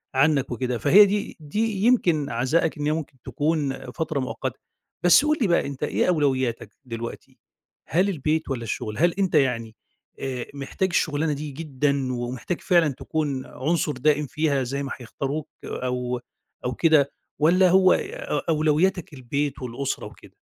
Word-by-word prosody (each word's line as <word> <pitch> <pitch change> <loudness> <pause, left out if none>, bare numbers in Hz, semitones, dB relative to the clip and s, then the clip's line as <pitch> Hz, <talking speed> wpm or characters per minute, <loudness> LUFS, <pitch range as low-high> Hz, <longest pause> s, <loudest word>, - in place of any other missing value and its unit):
عنك 140 -1 +3
وكده، 125 0 -2
فهي 185 - +7
دي 205 +1 -2
دي 205 +6 -2
يمكن 175 - +3
عَزائك 135 +8 +1
إن 145 - -3
هي 150 - +2
ممكن 155 -3 -4
تكون 145 -4 -2
فترة 155 0 -2
مؤقتة. 130 - -4 0.4
بس 180 - +6
قُل 305 0 +2
لي 220 - +3
بقى، 170 -5 +2
أنت 140 0 -6
إيه - - +1
أولويّاتك 130 - +1 0.2
دلوقتي؟ 115 -1 -7 0.5
هل 185 +5 +2
البيت 155 -2 -1
والّا 125 -3 -2
الشغل؟ 110 -1 -4
هل 170 +2 +3
أنت 190 -4 +1
يعني 115 -6 +1 0.4
آآ، 130 -2 -3
محتاج 140 +7 -2
الشُغلانة 155 -2 +1
دي 145 +1 -5
جدًا 140 -2 -1
ومحتاج 125 +7 -4
فعلًا 170 -4 +4
تكون 140 -1 -3
عنصر 150 +3 -1
دائم 150 +3 +2
فيها 150 -2 0
زي 140 +3 -3
ما 140 - -5
هيختاروك 140 +4 -4 0.2
أو 125 -1 -2 0.5
أو 125 - -1
كده 150 0 +3 0.3
والّا 180 +5 +5
هو 185 0 +6
أ 145 - -2
أولويّاتك 155 +3 +1
البيت 140 +2 -3
والأسرة 125 +2 -3
وكده؟ - - -13
145 Hz, 150 wpm, -24 LUFS, 130-165 Hz, 0.5 s, فهي